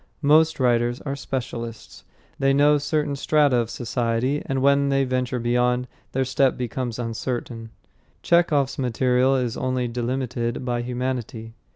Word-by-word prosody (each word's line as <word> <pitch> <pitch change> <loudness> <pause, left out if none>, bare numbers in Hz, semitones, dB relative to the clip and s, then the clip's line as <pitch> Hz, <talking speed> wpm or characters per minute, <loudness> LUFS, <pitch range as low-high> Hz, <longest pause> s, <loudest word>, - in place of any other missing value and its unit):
Most 155 +2 +4
writers 120 -1 +2
are 140 -2 -4
specialists. 120 -4 -6 0.3
They 135 0 +3
know 145 +1 +4
certain 145 -1 -1
strata 145 -2 +2
of 115 -1 0
society, 120 +4 -1
and 135 0 -1
when 140 0 +3
they 135 0 +2
venture 130 -1 -1
beyond, 125 +1 +1 0.3
their 130 0 +1
step 135 +1 +1
becomes 125 -1 -3
uncertain. 115 -1 -4 0.5
Chekhov's 155 -6 +2
material 125 +1 +2
is 125 -3 -1
only 130 -1 -1
delimited 120 0 -3
by 120 -1 -1
humanity. 120 -2 -4
125 Hz, 135 wpm, -23 LUFS, 120-135 Hz, 0.5 s, Most